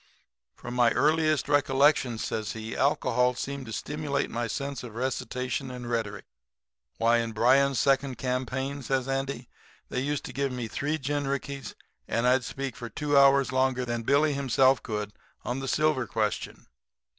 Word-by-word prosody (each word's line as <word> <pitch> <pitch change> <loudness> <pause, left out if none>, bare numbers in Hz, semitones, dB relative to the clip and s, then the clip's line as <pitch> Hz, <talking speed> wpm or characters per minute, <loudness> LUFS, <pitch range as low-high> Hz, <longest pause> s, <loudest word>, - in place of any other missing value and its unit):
"'From 120 - -8
my 120 -1 +4
earliest 155 +3 +2
recollections,' 140 -4 +3
says 110 +1 -3
he, 110 0 -6
'alcohol 125 -3 +2
seemed 140 0 -5
to - - -7
stimulate 145 +5 -2
my 120 0 -2
sense 140 +1 -4
of 120 -3 -9
recitation 130 +1 -2
and 125 -1 -7
rhetoric. 110 -4 -3 0.7
Why, 115 +1 +4
in 115 -1 -3
Bryan's 130 +4 +4
second 135 -1 +2
campaign,' 130 +2 -2
says 130 0 -1
Andy, 135 -2 -2 0.4
'they - - -2
used 145 +1 -2
to - - -7
give 140 0 -1
me 125 -2 -4
three 145 +7 -2
gin 145 0 -2
rickeys 140 -2 -4 0.3
and 115 +1 0
I'd 125 +1 +4
speak 135 -2 -5 0.2
two 145 -1 0
hours 140 -1 +5
longer 130 -1 +1
than 120 -1 -2
Billy 145 +5 +3
himself 135 -1 +3
could 105 -2 -4 0.3
on 125 +2 -2
the 135 - -5
silver 150 -3 +1
question. 110 -2 -2
130 Hz, 155 wpm, -28 LUFS, 120-140 Hz, 0.7 s, hours